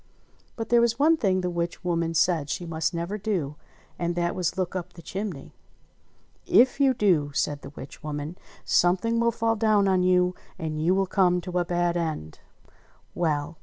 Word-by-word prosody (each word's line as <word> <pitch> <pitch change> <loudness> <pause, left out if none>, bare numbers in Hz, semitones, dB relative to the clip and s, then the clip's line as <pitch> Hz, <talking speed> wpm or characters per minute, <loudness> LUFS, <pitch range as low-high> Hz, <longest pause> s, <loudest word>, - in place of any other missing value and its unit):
But 225 -1 -5
there 240 0 +5
was 235 0 +2
one 310 +4 +5
thing 190 -10 +1
the 180 - -1
witch 170 0 -3
woman 170 -2 -1
said 160 -3 +2
she 175 - -3
must 160 -1 -1
never 170 +4 -3
do; 185 -9 -2 0.4
and 170 0 -1
that 175 0 0
was 180 0 -2
look 185 -1 -2
up 180 -1 -5
the 170 - -12
chimney! 190 -7 -5 0.9
"If 260 +3 +4
you 270 -2 +4
do," 175 -10 +2
said 145 0 -1
the - - -9
witch 135 - -10
woman, 150 +2 -5 0.3
"something 195 +7 +2
will 235 0 +3
fall 230 0 0
down 215 -2 +3
on 190 -1 +3
you, 180 0 +3 0.2
and 155 -3 -3
you 175 +4 +3
will 195 0 +2
come 180 -2 +2
to 180 0 -2
a 175 - 0
bad 175 0 0
end." 155 - -4 0.7
Well 155 -2 -1
180 Hz, 185 wpm, -26 LUFS, 165-200 Hz, 0.9 s, there